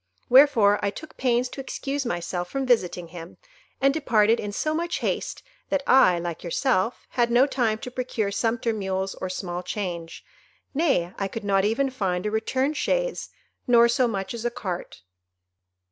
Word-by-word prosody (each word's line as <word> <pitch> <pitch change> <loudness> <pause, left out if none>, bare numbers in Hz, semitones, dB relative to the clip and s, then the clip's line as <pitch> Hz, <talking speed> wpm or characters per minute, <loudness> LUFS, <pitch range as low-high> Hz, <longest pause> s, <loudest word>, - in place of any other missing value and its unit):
Wherefore 245 -6 +6
I 200 - +2
took 310 +9 -10
pains 250 -1 +1
to 270 - -7
excuse 275 0 -3
myself 175 -1 -3
from 270 +4 -2
visiting 180 -8 +1
him, 170 0 -10 0.4
and 275 0 +3
departed 230 -7 +3
in 205 - -4
so 305 +9 -1
much 340 +2 -1
haste, - - -3 0.3
that 285 -1 0
I, 185 -10 +5
like 170 -1 -5
yourself, 195 +4 0
had 240 -1 +1
no 240 +3 +5
time 240 -6 0
to 250 +3 -8
procure 240 -5 -2
sumpter 230 +2 0
mules 190 -2 -2
or 185 - -5
small 180 -1 -4
change,—nay, 180 - -3
I 195 - 0
could 220 +3 -6
not 195 -1 +2
even 260 +6 +1
find 190 -7 -2
a 210 - -1
return 260 +6 0
chaise, - - -1 0.4
nor 235 -1 +6
so 240 +1 +2
much 195 -2 -3
as 235 -1 -6
a 240 - +1
cart." 185 - -6
225 Hz, 165 wpm, -25 LUFS, 190-260 Hz, 0.4 s, Wherefore